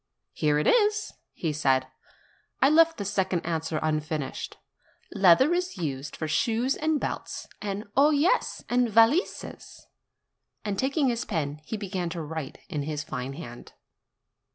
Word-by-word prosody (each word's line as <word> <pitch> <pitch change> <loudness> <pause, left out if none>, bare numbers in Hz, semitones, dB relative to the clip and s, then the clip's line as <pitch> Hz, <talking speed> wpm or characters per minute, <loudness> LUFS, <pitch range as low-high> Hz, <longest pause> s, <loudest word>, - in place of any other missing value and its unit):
"Here 150 -1 +1
it 150 - 0
is," 425 -2 +3 0.2
he 160 -3 -3
said; 135 -3 +2 0.7
"I 270 - +5
left 330 +1 +5
the 200 - -4
second 190 -3 0
answer 160 -2 -2
unfinished: 155 -2 -2 0.6
Leather 200 - +5
is 360 - -1
used 145 -3 -4
for 155 - -3
shoes 230 - +1
and 310 -1 0
belts, - - -4
and 205 0 -3
oh 280 +3 +6
yes! 310 +10 +1
and 245 -1 +2
valises." 230 - +1 0.8
And, 200 -2 -2
taking 275 +1 +2
his 235 -1 -1
pen, 150 -6 -3
he 220 - -4
began 185 -4 -3
to 170 0 -5
write 155 -2 -6
in 150 - -3
his 150 +1 -3
fine 125 +2 -5
hand. 120 -6 -10
190 Hz, 145 wpm, -27 LUFS, -, 0.8 s, oh